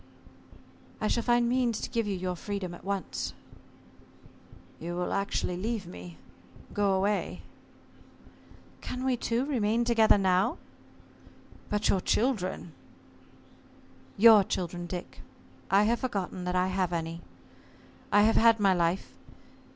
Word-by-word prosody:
"I 215 - 0
shall 235 - +1
find 240 0 +2
means 240 -2 +1
to - - -4
give 230 -2 -1
you 200 - -1
your 180 0 -3
freedom 195 -1 -5
at - - -12
once." 195 0 -3 1.5
"You 170 +2 -5
will 180 0 -2
actually 195 -2 -1
leave 215 +1 -3
me 90 - -10 0.6
go 200 -1 +2
away?" 200 +2 -1 1.4
"Can 255 +1 -5
we 260 -1 +2
two 240 +2 -1
remain 235 -4 0
together 225 -3 +4
now?" 185 -1 +2 1.1
"But 210 0 0
your 190 - +2
children?" 195 -7 -1 1.5
"Your 215 -1 +8
children, 175 -1 -4
Dick 175 0 -7 0.5
I 195 +2 +5
have 235 +3 +1
forgotten 190 -7 -3
that 180 0 -2
I 180 +1 +2
have 185 -1 -1
any. 165 0 -3 0.9
I 205 - +5
have 220 +1 +3
had 230 0 +5
my 195 -2 +4
life. 175 +1 -1
200 Hz, 130 wpm, -29 LUFS, 180-230 Hz, 1.5 s, Your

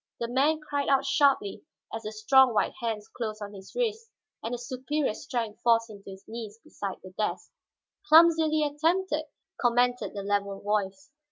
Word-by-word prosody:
The 235 - -2
man 280 +6 +2
cried 285 -1 -1
out 275 0 +3
sharply 270 -8 +2 0.3
as 225 - -4
the 215 -1 -6
strong 245 +3 +4
white - - +1
hands 225 -3 -3
closed 215 -3 -5
on 205 -1 -7
his 195 -1 -12
wrists 455 -2 -2 0.3
and 225 - -4
the 245 - -2
superior 260 +2 -2
strength 230 -3 -4
forced 230 -1 +3
him 205 -1 -12
to 195 - -12
his 190 0 -12
knees 225 -2 -7
beside 195 -2 -6
the 185 - -10
desk. 215 - -2 0.6
"Clumsily 320 -2 +6
attempted," 310 +2 0 0.3
commented 245 0 +1
the 200 - -4
level 200 -1 -1
voice. 210 +6 -2
240 Hz, 170 wpm, -28 LUFS, 210-290 Hz, 0.6 s, Clumsily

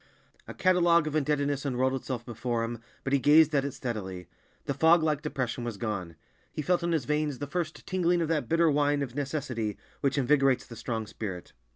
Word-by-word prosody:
A - - -8
catalogue 175 -3 +4
of 155 0 -3
indebtedness 145 -2 0
unrolled 130 -1 0
itself 130 -2 -4
before 120 0 -2
him, 115 0 -4 0.2
but 135 - -2
he 140 - +4
gazed 155 +3 +6
at 140 -2 +3
it 140 - -2
steadily. 95 - -5 0.4
The 140 - -1
fog 160 +4 +5
like 150 -2 +1
depression 130 -5 -3
was 120 -3 -4
gone. 95 -6 -4 0.4
He 150 - -4
felt 180 +3 +2
in 170 0 -1
his 155 -6 0
veins 150 -1 0
the 145 - -4
first 160 +2 -4
tingling 180 -1 +1
of 165 - 0
that 155 -2 -1
bitter 165 -1 +4
wine 145 0 +2
of 125 -4 -6
necessity 130 -7 -3 0.2
which 140 0 0
invigorates 135 -1 +3
the 115 - -10
strong 115 -1 -3
spirit. 100 -4 -7
140 Hz, 200 wpm, -28 LUFS, 120-155 Hz, 0.4 s, gazed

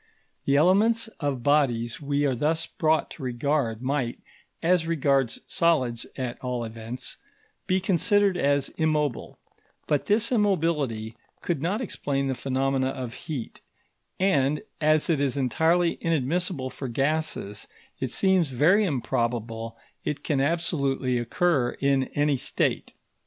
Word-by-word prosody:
The 140 - +3
elements 210 +9 +3
of 140 -5 -2
bodies 125 -4 +1
we 145 0 0
are 135 - +2
thus 155 +6 0
brought 160 -2 0
to - - -10
regard 125 -2 -1
might, 130 -3 -1 0.5
as 170 -1 +3
regards 140 -6 +1
solids 130 -9 +1
at 125 -2 -4
all 125 -2 -2
events, 115 +3 -6 0.5
be 185 +1 +2
considered 195 +1 +3
as 140 -4 +1
immobile; 150 -5 -1 0.5
but 145 -2 0
this 215 +3 +2
immobility 155 - 0 0.3
could 165 -6 -1
not 190 +8 -1
explain 140 - -2
the 135 - 0
phenomena 135 0 0
of 130 -3 -5
heat, 145 -7 -6 0.6
and, 150 -5 +2 0.2
as 155 0 +3
it 155 -4 +1
is 140 -1 0
entirely 165 +6 +2
inadmissible 165 -2 -1
for 135 - -6
gases, 135 -5 -2 0.3
it 130 -3 -2
seems 190 -3 +3
very 165 - +4
improbable 115 - -2 0.3
it 145 -1 -3
can 140 -3 0
absolutely 140 -5 0
occur 125 +1 +1
in 135 -1 +2
any 145 -1 +2
state. - - -1
140 Hz, 130 wpm, -26 LUFS, 125-165 Hz, 0.6 s, very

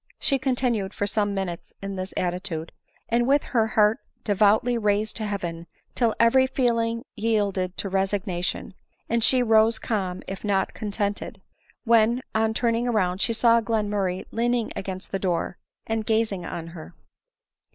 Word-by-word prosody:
She 275 -2 +1
continued 245 -6 0
for 205 - -1
some 205 0 0
minutes, 185 -3 -5
in 195 0 -5
this 185 0 -4
attitude, 175 -2 -2 0.4
and 240 +1 +2
with 280 +2 +4
her 225 -3 +1
heart 215 +3 +5 0.2
devoutly 215 +4 +3
raised 210 -1 0
to 220 - -2
heaven; 170 -4 -4 0.3
till 230 -3 +1
every 260 +3 +5
feeling 230 -3 0
yielded 200 -4 0
to - - -2
resignation, 190 -1 -2 0.3
and 230 -1 +1
she 255 +1 +4
arose 225 0 +4
calm, 190 -5 -2
if 195 - -6
not 200 -2 0
contented; 205 -1 -3 0.4
when, 235 +1 +3
on 220 0 +1
turning 235 0 +1
round, 190 -5 +1
she 230 - +2
saw 230 +1 +4
Glenmurray 205 -5 -1
leaning 235 0 0
against 185 0 -6
the 195 - -1
door, 180 -1 -1 0.3
and 225 0 -1
gazing 220 -4 0
on 165 -1 -6
her. 165 -2 -11
215 Hz, 150 wpm, -25 LUFS, 190-230 Hz, 0.4 s, heart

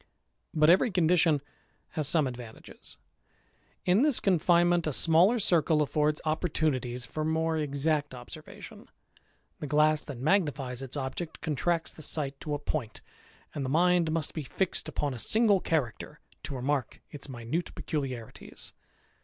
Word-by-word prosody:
But 155 +1 +5
every 190 +7 +4
condition 165 -5 +3 0.5
has 155 -3 -2
some 155 -1 +3
advantages. 120 -3 -5 0.9
In 185 +5 +4
this 290 -3 +4
con 185 -4 +2
finement, 175 0 +3
a 150 - -1
smaller 175 - +4
circle 165 -7 +3
affords 150 +1 +1
opportunities 150 -6 -1
for 155 +6 -4
more 160 +1 0
exact 145 -1 0
observation. 120 -1 -11 0.7
The 150 - -5
glass 150 +1 +3
that 140 -4 -8
magnifies 140 -4 0
its 135 +1 -6
object 140 +5 -5
cxjntracts 160 +2 -1
the - - -11
sight 140 -2 -3
to 150 -1 -3
a - - -1
point; 140 -6 -4 0.5
and 145 - -3
the 130 - -2
mind 170 +2 +3
must 160 -2 -1
be 155 - -3
fixed 175 +7 -1
upon 145 -2 -2
a 120 - -7
single 215 - +3
character 150 - -2 0.3
to 145 -1 -5
remark 130 0 -2
its 145 -1 -7
minute 125 +7 -3
peculiarities. 130 -7 -6
155 Hz, 145 wpm, -29 LUFS, 135-165 Hz, 0.9 s, But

